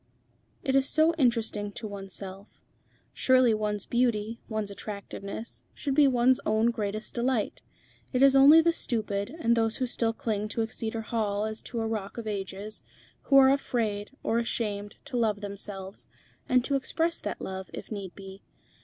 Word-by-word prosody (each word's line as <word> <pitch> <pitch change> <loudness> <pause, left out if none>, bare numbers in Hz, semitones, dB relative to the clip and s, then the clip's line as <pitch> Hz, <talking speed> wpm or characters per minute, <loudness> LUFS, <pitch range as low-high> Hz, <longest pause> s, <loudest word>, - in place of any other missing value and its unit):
It 265 - +1
is 270 0 +4
so 315 +2 +4
interesting 225 -5 +1
to 220 - -5
oneself. 195 0 -8 0.5
Surely 255 -3 +4
one's 210 -1 -1
beauty, 230 -2 0
one's 215 -2 -2
attractiveness, 200 +1 -7
should 280 -2 -2
be 290 0 +6
one's 255 0 +4
own 220 +2 +2
greatest 215 -1 -3
delight. 240 -2 -1 0.5
It 255 0 +3
is 275 0 +7
only 285 +4 +9
the 335 +1 +3
stupid, 210 -8 -1
and 235 -5 +3
those 225 -1 +1
who 260 - -1
still 230 -2 0
cling 215 -2 -2
to 225 +1 -1
Exeter 225 0 -3
Hall 210 -2 -1
as 220 0 -4
to 235 -2 -4
a 225 - -1
Rock 215 -2 -4
of 235 - -5
Ages, 200 0 -5 0.4
who 275 - +5
are 265 0 +8
afraid, 220 -7 -1
or 230 - +1
ashamed, 205 -3 -3
to 275 -3 -4
love 215 -3 +1
themselves, 200 -1 -7 0.4
and 250 -1 +4
to 280 - -1
express 325 +5 0
that - - -4
love, 190 0 -6
if - - -8
need 195 -4 -6
be. 195 0 -10
220 Hz, 165 wpm, -28 LUFS, 205-250 Hz, 0.5 s, only